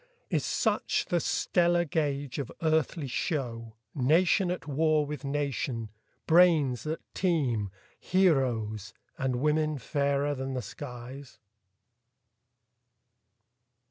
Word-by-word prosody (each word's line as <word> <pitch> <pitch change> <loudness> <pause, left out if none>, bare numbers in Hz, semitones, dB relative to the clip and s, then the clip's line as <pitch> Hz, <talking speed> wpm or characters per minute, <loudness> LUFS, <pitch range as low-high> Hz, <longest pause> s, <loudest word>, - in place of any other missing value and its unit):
Is - - +1
such - - 0
the - - +2
stellar 175 -1 +2
gauge 145 -3 -2
of 140 - -4
earthly 160 0 +1
show, 120 - -3 0.2
Nation 165 +7 +3
at 175 -3 -4
war 155 +1 +2
with 150 +1 -6
nation, 140 -5 -2 0.4
brains 160 -7 +4
that 155 +1 -3
teem, 135 - 0 0.3
Heroes, 120 - +1 0.2
and 130 -1 0
women 150 +3 +1
fairer 140 +1 0
than 135 -1 -4
the 125 - -3
skies? 125 +2 -9
145 Hz, 100 wpm, -29 LUFS, 125-160 Hz, 0.4 s, brains